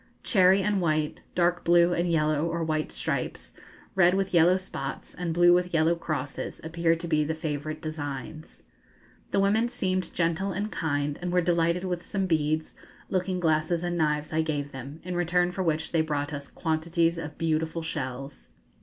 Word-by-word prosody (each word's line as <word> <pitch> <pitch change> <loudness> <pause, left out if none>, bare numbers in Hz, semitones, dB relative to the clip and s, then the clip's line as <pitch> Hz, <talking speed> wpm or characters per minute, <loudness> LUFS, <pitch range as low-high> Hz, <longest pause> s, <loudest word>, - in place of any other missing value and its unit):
Cherry 190 -1 +4
and 205 -2 +1
white, 155 -2 0 0.2
dark 175 0 +2
blue 175 +1 +5
and 175 0 0
yellow 155 -1 +2
or 170 0 -2
white 155 -1 -1
stripes, - - -3 0.4
red 180 -1 +5
with 195 -1 -1
yellow 175 +2 +5
spots, 135 -7 -6
and 175 -2 -3
blue 175 +1 +6
with 180 -1 +1
yellow 160 +1 +4
crosses, 150 -5 -4
appear 165 +1 +1
to 170 +1 -6
be 155 -2 +2
the 160 +2 -2
favourite 155 0 -4
designs. 155 0 -6 0.7
The - - +1
women 215 +4 +3
seemed 185 -5 -1
gentle 170 +3 0
and 205 +4 -3
kind, 145 -2 -1
and 175 0 -2
were 180 - +3
delighted 170 0 +1
with 180 -2 -2
some 195 -1 -2
beads, 155 -2 0 0.4
looking 185 0 0
glasses, 160 +1 +1
and 175 0 -1
knives 150 -2 0
I 160 - +3
gave 145 -3 -2
them, 135 +4 -8
in 180 0 -4
return 175 +1 +2
for 190 - -3
which 160 -2 -1
they 165 - +3
brought 150 -1 -2
us 140 -1 -6
quantities 165 +1 0
of 155 -2 -7
beautiful 160 0 -1
shells. 135 -3 -5
165 Hz, 175 wpm, -27 LUFS, 155-180 Hz, 0.7 s, blue